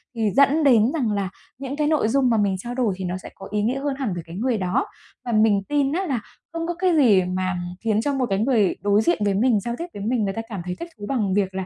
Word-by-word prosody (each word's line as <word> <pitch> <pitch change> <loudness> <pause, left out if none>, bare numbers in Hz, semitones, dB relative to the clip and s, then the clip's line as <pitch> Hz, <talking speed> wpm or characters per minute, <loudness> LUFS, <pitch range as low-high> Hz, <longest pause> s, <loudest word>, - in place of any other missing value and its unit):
thì 220 -3 0
dẫn 280 +3 +4
đến 240 -4 +5
rằng 250 -9 0
là 200 -2 -1 0.3
những 270 +1 -5
cái 300 0 0
nội 305 -8 +2
dung 260 +2 +2
mà 225 - +2
mình 200 -2 +1
trao 240 +4 -5
đổi 240 -6 +1
thì 190 - -4
nó 180 +1 -2
sẽ - - -10
có 195 - -10
ý 210 0 0
nghĩa 250 +5 0
hơn 280 -1 -2
hẳn 235 -8 -1
với 175 -2 -5
cái 165 +1 -10
người 235 +2 0
đó. 195 +8 0 0.4
Và 240 - -2
mình 215 -2 +3
tin 285 -1 +1
á 380 +2 -1
là 265 -8 -1 0.3
không 330 0 -3
có 345 - -1
cái 365 -2 +2
gì 210 -10 +5
mà 185 0 -2 0.3
khiến 220 -1 +1
cho 285 +4 -1
một 265 -2 0
cái 195 0 0
người 220 -4 +2
đối 205 +1 +3
diện 345 +4 +1
với 200 - +2
mình, 220 +1 +3
giao 235 +4 -4
tiếp 340 - -4
với 200 - -6
mình 235 -2 +1
người 195 -1 -1
ta 225 - -3
cảm 200 -5 -5
thấy 180 0 -3
thích 340 - -6
thú 205 - -7
bằng 210 -8 0
việc 190 -2 0
là, 190 0 -3
225 Hz, 295 wpm, -23 LUFS, 200-270 Hz, 0.4 s, đến